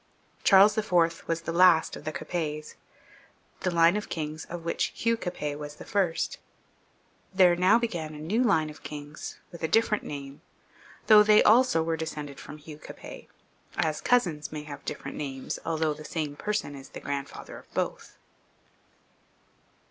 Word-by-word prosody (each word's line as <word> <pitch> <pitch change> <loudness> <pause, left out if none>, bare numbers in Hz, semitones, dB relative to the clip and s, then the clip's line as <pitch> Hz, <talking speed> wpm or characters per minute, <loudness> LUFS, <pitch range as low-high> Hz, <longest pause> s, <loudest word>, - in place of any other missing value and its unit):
Charles 200 +1 +7
IV. 170 -6 +1
was 165 0 -1
the 165 - -4
last 170 -2 +5
of - - -11
the 155 - -2
Capets, 155 -1 -4 0.9
the - - 0
line 170 +1 +4
of 210 - -3
kings 155 -1 -4
of 170 -1 -8
which 170 - 0
Hugh 230 0 +1
Capet 150 -8 -4
was 150 0 -7
the - - -11
first; 185 -5 0 1.0
there 180 -2 +6
now 185 +5 +5
began 170 -10 -3
a - - -8
new 190 +10 0
line 160 -9 +2
of 150 - -15
kings 150 0 -8
with 170 - -10
a 160 - 0
different 215 +4 +2
name, 140 -1 -7 0.6
though 215 -2 +8
they 210 0 +6
also 230 -7 +5
were 165 0 -1
descended 150 -3 -5
from 150 - -9
Hugh 150 0 -11
Capet, - - -10 0.5
as 155 -1 0
cousins 170 -12 +1
may 150 -1 -5
have 145 -1 -9
different - - -5
names, 135 -3 -4
although 160 -1 0
the 155 +1 -10
same 150 -2 -3
person 210 -5 -2
is 135 -1 -10
the - - -8
grandfather 140 -1 -6
of - - -21
both. - - -3
160 Hz, 165 wpm, -28 LUFS, 150-185 Hz, 1.0 s, though